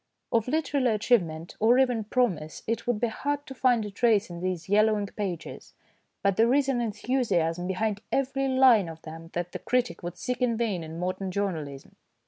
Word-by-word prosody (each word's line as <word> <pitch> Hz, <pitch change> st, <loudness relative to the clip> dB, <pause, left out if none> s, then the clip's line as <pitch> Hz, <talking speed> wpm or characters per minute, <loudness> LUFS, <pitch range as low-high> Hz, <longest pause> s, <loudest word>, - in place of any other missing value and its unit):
Of 230 Hz, -1 st, +1 dB
literary 280 Hz, -5 st, +1 dB
achieve 230 Hz, +1 st, +4 dB
ment 160 Hz, 0 st, -8 dB
or 230 Hz, +3 st, +5 dB
even 250 Hz, -5 st, +2 dB
promise 205 Hz, -10 st, -1 dB
it 230 Hz, +1 st, -2 dB
would 240 Hz, -3 st, +1 dB
be 240 Hz, -, +2 dB
hard 290 Hz, +5 st, -3 dB
to 270 Hz, -, -8 dB
find 245 Hz, -4 st, +2 dB
a 205 Hz, -, -6 dB
trace 210 Hz, -3 st, +2 dB
in 170 Hz, -, -7 dB
these 180 Hz, -2 st, -3 dB
yellowing 210 Hz, +1 st, +3 dB
pages, 195 Hz, -5 st, -6 dB, 0.5 s
but 195 Hz, -2 st, +2 dB
there 230 Hz, +2 st, +4 dB
is 285 Hz, -1 st, +2 dB
an 255 Hz, -3 st, +1 dB
enthusiasm 205 Hz, -7 st, 0 dB
behind 205 Hz, +2 st, -1 dB
every 270 Hz, 0 st, 0 dB
line 260 Hz, -8 st, +5 dB
of 160 Hz, 0 st, -11 dB
them 165 Hz, +1 st, -9 dB
that 175 Hz, 0 st, -3 dB
the -, -, -5 dB
critic 245 Hz, -7 st, -1 dB
would 175 Hz, 0 st, -6 dB
seek 250 Hz, +1 st, -3 dB
in 235 Hz, -3 st, +2 dB
vain 210 Hz, -7 st, -1 dB
in 160 Hz, +1 st, -8 dB
modern 185 Hz, +2 st, -3 dB
journalism. 160 Hz, -8 st, -4 dB
215 Hz, 190 wpm, -27 LUFS, 180-250 Hz, 0.5 s, or